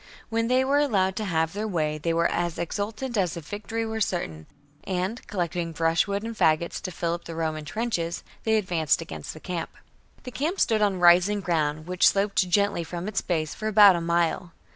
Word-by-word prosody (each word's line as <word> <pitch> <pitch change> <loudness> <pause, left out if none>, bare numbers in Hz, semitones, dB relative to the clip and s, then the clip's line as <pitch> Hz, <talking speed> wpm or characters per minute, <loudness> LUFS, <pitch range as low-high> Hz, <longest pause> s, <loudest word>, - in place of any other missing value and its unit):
When 230 0 0
they 255 +2 +3
were 280 +2 +3
allowed 195 -10 +1
to 215 - -2
have 160 -3 0
their 210 +2 -3
way 155 -5 -1
they 165 +2 -1
were 170 0 +1
as 175 -1 0
exultant 215 +8 -3
as 180 -3 0
if 165 - -8
victory 225 +2 -4
were 220 0 -4
certain, 80 - -2 0.4
and, 190 +5 -2
collecting 175 -3 -2
brushwood 165 +6 +1
and 230 0 -5
faggots 160 -2 +1
to 185 - -5
fill 170 -1 -2
up 170 - -6
the 165 - -7
Roman 155 -2 -2
trenches, 175 -4 -2 0.2
they 220 0 +2
advanced 170 -7 +1
against 80 - -8
the - - -9
camp. 175 0 -4
19. - - -25 0.3
The 250 - -7
camp 320 +10 -2
stood 220 -2 +2
on 200 -3 +2
rising 175 +4 +5
ground, 155 -4 -1
which 180 +1 +3
sloped 195 -2 +2
gently 200 -2 +2
from 175 +3 -6
its 210 -2 -1
base 155 -3 -2
for 215 - -5
about 205 -3 +7
a 170 - -2
mile. 170 +1 0
180 Hz, 205 wpm, -26 LUFS, 165-210 Hz, 0.4 s, about